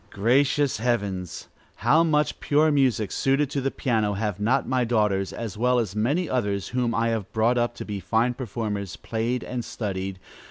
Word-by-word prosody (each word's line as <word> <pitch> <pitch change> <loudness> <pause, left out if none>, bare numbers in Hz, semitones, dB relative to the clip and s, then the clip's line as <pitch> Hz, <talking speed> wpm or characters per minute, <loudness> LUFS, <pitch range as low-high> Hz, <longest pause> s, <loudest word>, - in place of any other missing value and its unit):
Gracious 135 +7 +2
heavens! 100 -7 -2 0.3
how 160 +2 +4
much 150 -2 +1
pure 155 +2 +3
music, 130 -8 +2
suited 135 +1 +1
to 140 - -1
the 135 - 0
piano, 110 -6 0
have 100 -1 -2
not 110 +5 +1
my 130 -1 +1
daughters, 105 -5 +1
as 110 -3 -6
well 125 +1 +3
as 110 -5 -1
many 145 +12 +1
others 100 -7 -1
whom 125 -2 0
I 115 0 +1
have 110 -4 -3
brought 115 +2 +2
up 120 0 0
to - - -7
be 105 -2 -4
fine 115 +6 +1
performers, 105 - -4
played 115 +2 -2
and 125 -1 -4
studied! 95 -4 -4
115 Hz, 175 wpm, -25 LUFS, 105-130 Hz, 0.3 s, how